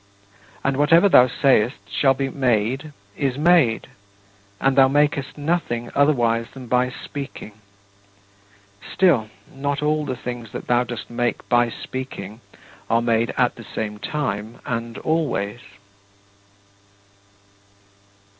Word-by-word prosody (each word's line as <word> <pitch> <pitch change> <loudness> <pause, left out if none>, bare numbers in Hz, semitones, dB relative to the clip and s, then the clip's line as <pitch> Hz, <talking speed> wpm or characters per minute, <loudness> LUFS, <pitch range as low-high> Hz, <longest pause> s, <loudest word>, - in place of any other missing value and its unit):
And 135 -1 0
whatever 165 +6 +5
thou 125 -9 +7
sayest 125 -1 +2
shall 135 +7 +2
be 135 +1 -1
made 130 +3 0 0.2
is 135 -2 -1
made, 155 -7 +3 0.7
and 135 0 +2
thou 135 -1 +7
makest 145 0 +1
nothing 145 -6 -2
otherwise 120 -6 +2
than 130 -2 -9
by 125 +1 +1
speaking. 140 -2 -8 1.4
Still, 140 - +3 0.2
not 140 +1 -2
all 150 0 +1
the 130 -3 -3
things 120 -2 -7
that - - -6
thou 120 0 +2
dost 120 -1 -7
make 120 0 -2
by 120 -1 +3
speaking 115 -4 -7 0.5
are 115 +1 +2
made 115 0 +1
at - - +2
the - - -9
same 105 -1 -3
time 110 -4 -3
and 115 -1 -4
always. 145 -10 -1
125 Hz, 115 wpm, -22 LUFS, 115-145 Hz, 1.4 s, thou